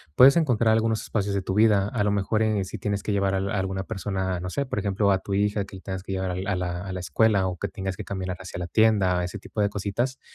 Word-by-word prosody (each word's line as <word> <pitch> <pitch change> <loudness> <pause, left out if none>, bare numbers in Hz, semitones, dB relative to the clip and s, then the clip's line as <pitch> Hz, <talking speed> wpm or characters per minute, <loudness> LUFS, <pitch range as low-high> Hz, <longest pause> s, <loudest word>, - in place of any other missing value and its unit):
Puedes 135 +7 +8
encontrar 120 -9 +3
algunos 110 0 +1
espacios 100 -2 -2
de 100 - 0
tu 95 - -3
vida, 105 -1 +4
a 105 -1 -1
lo 105 - +2
mejor, 105 +2 +1
eh, 105 -3 +1
si 95 - -6
tienes 100 +1 -2
que 105 - -1
llevar 100 -1 +1
al 95 +1 -1
alguna 95 -1 -2
persona, 95 -3 -3
no 90 - -4
sé, 140 +8 -2
por 125 - -3
ejemplo, 100 0 +1
a 95 - +2
tu 100 - -5
hija, 100 +1 +1
que 95 - -10
le 95 - -13
tengas 95 -1 -5
que 95 - -7
llevar 95 -1 -1
al 90 +1 -3
a 90 -1 -2
la 95 - -4
escuela 95 +4 +2
o 90 -1 -4
que 100 - -3
tengas 95 -2 -4
que - - -6
caminar 95 -2 -4
hacia 95 -1 -8
la 90 - -4
tienda, 95 -4 +3
ese 90 +4 -4
tipo 105 +2 -4
de 100 - +2
cositas, 105 +6 -2
100 Hz, 265 wpm, -25 LUFS, 95-105 Hz, -, Puedes